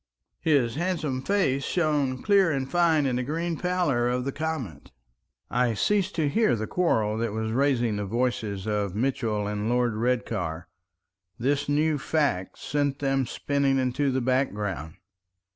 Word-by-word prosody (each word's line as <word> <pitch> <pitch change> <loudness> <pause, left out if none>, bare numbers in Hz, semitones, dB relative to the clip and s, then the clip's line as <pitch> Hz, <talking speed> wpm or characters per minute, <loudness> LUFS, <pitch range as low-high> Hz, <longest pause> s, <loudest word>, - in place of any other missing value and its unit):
His 140 -6 +2
handsome 155 -7 -1
face 140 -6 +1
shone 145 -6 0
clear 200 -4 +4
and 135 -2 -1
fine 165 -2 +3
in 125 -2 0
the 125 - -1
green 165 +5 -2
pallor 165 -9 +1
of 125 0 -1
the 140 - -1
comet. 135 - -4 0.6
I 120 -1 +1
ceased 200 - +1
to 160 -3 +1
hear 215 - +2
the 110 -1 -3
quarrel 110 -10 +1
that 115 -2 -1
was 110 0 -2
raising 120 -4 +1
the 105 - -2
voice 120 +4 0
of 100 -1 -2
Mitchell 110 -3 0
and 105 +1 -2
Lord 120 -1 +2
Redcar. 110 -8 -2 0.7
This 140 +4 0
new 150 +1 +2
fact 140 - -1
sent 145 -1 -1
them 135 -2 0
spinning 140 0 0
into 130 +2 +1
the 130 0 0
background. 105 - -1
130 Hz, 150 wpm, -26 LUFS, 110-150 Hz, 0.7 s, clear